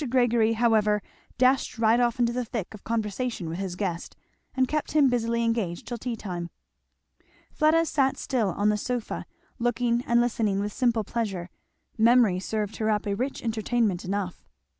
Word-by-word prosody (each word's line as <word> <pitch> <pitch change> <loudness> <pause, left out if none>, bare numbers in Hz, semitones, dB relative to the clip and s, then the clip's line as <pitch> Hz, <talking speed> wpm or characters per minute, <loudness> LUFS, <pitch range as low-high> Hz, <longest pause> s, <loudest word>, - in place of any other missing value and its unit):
Gregory, 235 -3 +3
however, 220 -2 +3 0.4
dashed 255 0 +2
right 225 +1 +4
off 240 0 +1
into 235 -1 +2
the 250 0 -1
thick 225 -4 -5
of 215 - -12
conversation 225 -2 -2
with 165 +3 -4
his 190 -2 -3
guest, 180 -3 -4 0.4
and 260 -1 +2
kept 305 0 -2
him 295 -3 +5
busily 235 -1 0
engaged 225 -7 -1
till 240 -1 -5
tea 245 0 -3
time. 175 -5 -5 1.0
Fleda 320 +2 +3
sat 270 -4 +1
still 235 -7 0
on 205 +3 +1
the 210 - +2
sofa, 245 +1 -4 0.3
looking 240 0 +1
and 235 0 +4
listening 220 -4 +1
with 205 0 -2
simple 235 -4 +1
pleasure; 195 -6 -3 0.5
memory 230 -5 +5
served 215 +2 -3
her 220 0 0
up 210 -1 0
a 200 - 0
rich 255 +6 -3
entertainment 225 -4 0
enough. 190 -1 -3
225 Hz, 165 wpm, -26 LUFS, 205-245 Hz, 1.0 s, him